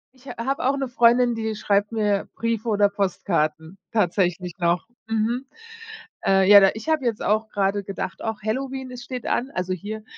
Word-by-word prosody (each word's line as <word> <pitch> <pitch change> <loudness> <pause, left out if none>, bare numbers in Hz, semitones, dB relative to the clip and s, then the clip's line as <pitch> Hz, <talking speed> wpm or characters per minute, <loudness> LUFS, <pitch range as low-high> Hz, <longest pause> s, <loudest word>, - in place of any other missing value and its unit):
Ich 260 +2 -19
ha 250 - -7
habe 275 -1 -1
auch 275 +1 +1
'ne 270 -1 -2
Freundin, 240 0 +4
die 220 -1 -3
schreibt 205 +1 +1
mir 210 -3 0
Briefe 230 0 -2
oder 205 -1 +4
Postkarten, 175 -4 -2
tatsächlich 180 -3 0
noch. 175 +4 +1 0.2
Mhm, 230 +4 -1 0.8
äh, 195 0 +4
ja, 205 -1 +10
da 195 - +6
ich 220 +7 -8
habe 310 -4 +1
jetzt 230 -3 -1
auch 215 +1 +1
grade 200 0 0
gedacht: 190 -2 -5
„Och 220 -1 -3
Halloween, 260 +3 -3
es 245 -1 -8
steht 250 -1 -6
an.“ 260 +3 -1
Also, 185 0 -2
hier, 210 +4 -6
215 Hz, 185 wpm, -23 LUFS, 195-240 Hz, 0.8 s, ja